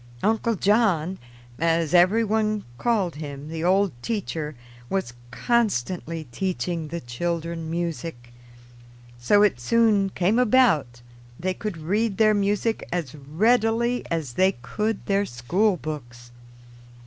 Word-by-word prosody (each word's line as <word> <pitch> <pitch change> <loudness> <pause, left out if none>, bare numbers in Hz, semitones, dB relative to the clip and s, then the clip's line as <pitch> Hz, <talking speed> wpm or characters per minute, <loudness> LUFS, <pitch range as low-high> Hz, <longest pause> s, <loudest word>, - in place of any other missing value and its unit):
"Uncle 225 +2 +1
John," 190 -4 +2 0.4
as 165 -1 +1
every 185 +6 +5
one 215 -1 0 0.2
called 200 -10 0
him, 145 -1 -7
the 160 0 -4
old 190 +2 +3
teacher, 160 - -3 0.3
was 190 -12 -2 0.2
constantly 180 - -1
teaching 175 +1 -2
the 170 +3 -4
children 165 +5 -3
music; 165 -7 -4 0.9
so 205 +13 +4
it 195 -12 +2
soon 210 - +3
came 190 +5 +1
about 210 - +3 0.4
they 185 +2 -1
could 210 -2 -5
read 195 +6 -1
their 215 -1 +5
music 205 +2 0
as 170 -7 -3
readily 225 - +1
as 160 -7 -2
they 190 +7 +3
could 210 - -2
their 200 0 +2
school 180 - 0
books. 120 -7 -8
180 Hz, 120 wpm, -24 LUFS, 155-215 Hz, 0.9 s, every